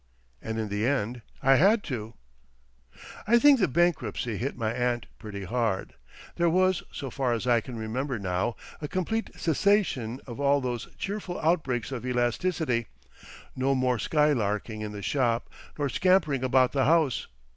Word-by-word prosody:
And 110 0 -4
in 110 -2 -2
the 105 +3 0
end 125 -3 -1 0.2
I 135 0 +6
had 200 - +4
to. 115 -4 -5 1.1
I 235 +2 +6
think 280 +1 +6
the 190 - +3
bankruptcy 125 - 0
hit 130 +4 -3
my 110 -2 -1
aunt 120 -1 -1
pretty 100 -3 -7
hard. 110 -1 -1 0.4
There 170 -1 +3
was, 185 0 +2
so 135 -3 -6
far 130 -4 0
as 115 +1 -2
I 120 -2 +3
can 120 0 -8
remember 125 +4 -3
now, 95 +3 -1 0.3
a 150 - -3
complete 185 +7 -2
cessation 160 - +1
of 120 0 -8
all 140 0 +3
those 125 -3 -3
cheerful 195 -3 -4
outbreaks 140 -8 0
of 125 -3 -4
elasticity, 125 +1 0 0.7
no 135 +1 +1
more 125 -2 +1
skylarking 110 -7 0
in 105 -1 -4
the 105 -1 -7
shop 120 -1 0 0.3
nor 145 -1 0
scampering 165 -4 +2
about 130 0 +3
the 135 -2 +1
house. 155 -5 +2
130 Hz, 155 wpm, -27 LUFS, 115-155 Hz, 1.1 s, I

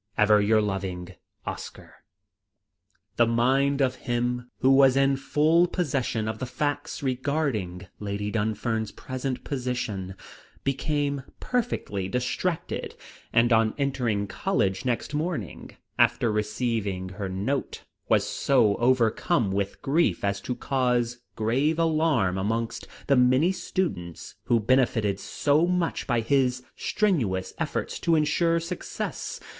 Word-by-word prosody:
"Ever 105 0 +5
your 110 +1 +3
loving 95 -3 -4 0.3
"OSCAR." - - -7 1.2
The 120 - +5
mind 135 +4 +2
of 130 -2 +2 0.2
him 125 0 -1
who 130 - +5
was 135 -1 +6
in 135 0 +4
full 150 +6 +3
possession 130 -10 -1
of 110 0 -3
the 130 - -3
facts 145 +4 -3
regarding 130 - -1
Lady 105 0 -3
Dunfern's 110 0 -1
present 130 0 -4
position 120 -8 -3 0.5
became 140 +1 -1 0.2
perfectly 105 - -2
distracted, 125 - -2 0.4
and 120 +1 +4
on 110 -1 +3
entering 125 -7 0
College 100 - -1
next 125 +3 -1
morning, 150 - -4 0.2
after 115 - +3
receiving 105 -3 -1
her 95 +1 -5
note, 100 +10 -2 0.3
was - - +4
so 115 -7 +2
overcome 120 - +2
with 100 0 -2
grief 160 +5 +1
as 100 0 0
to 125 - -3
cause 125 -3 0 0.2
grave 135 +9 +1
alarm 155 - +2
amongst 115 +4 -2 0.2
the 140 - +4
many 130 +7 +4
students 95 - -3
who 120 - +3
benefitted 110 -4 +2
so 150 +9 +1
much 180 -2 -1
by 120 -3 +2
his 125 0 +1
strenuous 120 - 0
efforts - - -2
to 170 - +2
insure 165 +2 +2
success. 170 +1 -5
125 Hz, 120 wpm, -26 LUFS, 105-140 Hz, 1.2 s, was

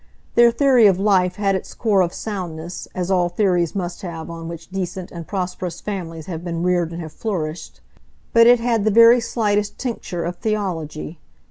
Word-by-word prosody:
Their 235 0 +6
theory 245 -2 +5
of 190 -3 +3
life 185 -3 +2
had 200 -1 +1
its 190 - -4
core 210 -5 +2
of 175 -2 +1
soundness, 175 -5 -6
as 185 +1 -2
all 180 -2 +2
theories 175 -3 +1
must 175 -2 -4
have 170 -3 -6
on 165 -1 -7
which 170 +1 -9
decent 185 -1 -4
and 170 -2 -8
prosperous 180 -2 -4
families 165 -6 -5
have 170 -2 -6
been 170 -1 -3
reared 175 -2 +1
and 170 - -6
have 155 -1 -9
flourished; 170 -7 -4 0.5
but 230 0 +7
it 245 0 +7
had 230 -2 +1
the 215 - +3
very 230 +3 +7
slightest 210 -3 -1
tincture 220 -8 -4
of 175 +1 -4
theology. 170 -7 -3
185 Hz, 185 wpm, -21 LUFS, 170-210 Hz, 0.5 s, but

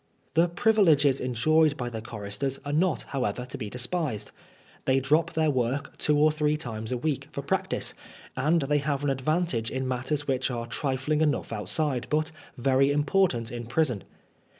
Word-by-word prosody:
The 165 +2 +4
privileges 165 - +4
enjoyed 145 +5 +3
by 120 -1 -3
the 110 -1 -5
choristers 110 +5 -3
are 145 - -2
not, 165 0 +2
however, 125 -2 -2
to 125 - -8
be 105 - -5
despised. 125 - -2 0.5
They 135 0 +3
drop 155 +5 +2
their 160 -1 +2
work 130 +2 -1
two 150 -1 +2
or 155 +1 +5
three 150 0 +1
times 110 -6 -4
a 125 - 0
week 145 +2 -2
for - - -5
practice, - - -1 0.4
and 150 +4 +2
they 145 +2 +2
have 145 0 -1
an 145 - +2
advantage 135 -3 0
in 130 0 -2
matters 135 +4 -2
which 130 -1 +1
are 120 -2 -3
trifling 135 +5 -1
enough 150 -6 0
outside, 120 - -1
but 155 +1 +1 0.3
very 135 +2 +3
important 145 -5 +1
in 120 -1 -6
prison. 125 -4 +1
140 Hz, 170 wpm, -27 LUFS, 125-155 Hz, 0.5 s, or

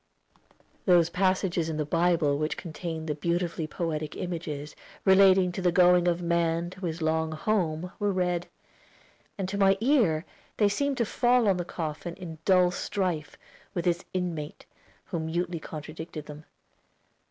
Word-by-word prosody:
Those 170 -2 +5
passages 185 -3 +1
in 155 - -3
the 150 - -1
Bible 165 -2 +2
which 155 +1 -1
contain 165 -1 -5
the 155 - -1
beautifully 170 +1 -1
poetic 155 -2 -3
images 155 -4 -5 0.3
relating 190 -1 +6
to 185 - -5
the 180 -1 +3
going 180 0 +5
of 175 0 +1
man 170 0 +1
to 185 -1 -5
his 165 0 -4
long 160 0 0
home 175 -1 -1
were 205 -1 +1
read, 180 -2 0 0.9
and 195 -2 -2
to 200 +2 -3
my 195 0 +5
ear 220 - +3 0.3
they 205 -2 +4
seemed 280 +6 0
to 235 - +2
fall 240 +1 +3
on 195 -2 +3
the 175 - -3
coffin 165 0 -5
in 165 -4 -8
dull 180 -2 +5
strife 180 -6 -2 0.4
with 175 -1 -2
its 175 -1 +1
inmate, 170 -5 -4 0.4
who 170 - -3
mutely 170 +2 -2
contradicted 155 0 -7
them. 150 +1 -10
175 Hz, 155 wpm, -28 LUFS, 160-185 Hz, 0.9 s, relating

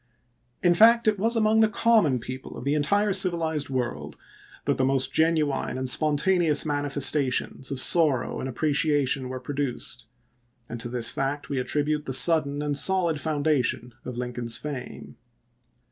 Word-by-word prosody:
In 175 -1 +4
fact 230 +5 +5
it 210 -2 +1
was 225 +4 +1
among 220 0 +2
the 220 -1 +4
common 215 - +2
people 130 +2 -8
of - - -8
the 140 - 0
entire 200 +8 +1
civilized 165 -6 0
world 125 -2 -4 0.5
that - - 0
the 130 - 0
most 135 0 0
genuine 155 -5 0
and 130 0 -4
spontaneous 155 +3 +2
manifestations 145 -2 0
of 135 -2 -2
sorrow 150 -4 +2
and 130 - -4
appre 150 +4 -2
ciation 140 -3 0
were 130 0 -6
produced, 125 -3 -4 0.6
and 115 - -7
to 120 +1 -5
this 120 -1 +1
fact 135 -1 -4
we 140 - -2
attribute 150 +3 -1
the 130 - -4
sudden 145 0 +3
and 145 -1 -1
solid 170 -3 +1
foundation 145 -6 -1
of 125 -1 -7
Lincoln's 120 -2 -2
fame. 135 0 -8
145 Hz, 155 wpm, -25 LUFS, 130-165 Hz, 0.6 s, fact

